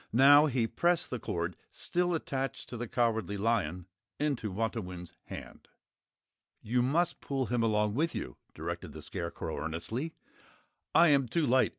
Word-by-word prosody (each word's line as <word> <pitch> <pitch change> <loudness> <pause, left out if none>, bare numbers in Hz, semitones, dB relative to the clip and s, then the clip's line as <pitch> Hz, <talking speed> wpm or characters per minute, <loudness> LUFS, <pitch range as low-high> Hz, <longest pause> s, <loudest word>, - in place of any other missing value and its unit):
Now 145 +5 +8
he 125 -5 +1
pressed 170 +9 +1
the 125 - -2
cord, 85 -3 -2
still 175 0 0
attached 135 -3 -3
to - - -6
the 120 +1 -4
Cowardly 110 -4 0
Lion, 95 -6 0 0.3
into 140 -8 -1
Wantowin's 95 -5 -3
hand. - - -9 0.9
"You 120 +3 +1
must 155 +8 +1
pull 135 -2 -1
him 120 0 0
along 105 -2 +2
with 155 +7 0
you," - - -5 0.2
directed - - -5
the - - -9
Scarecrow, 85 0 -4
earnestly. 110 - -3 0.8
"I 170 0 +8
am 140 -3 +4
too 155 +7 +1
light. 130 +1 +4
120 Hz, 150 wpm, -31 LUFS, 105-145 Hz, 0.9 s, Now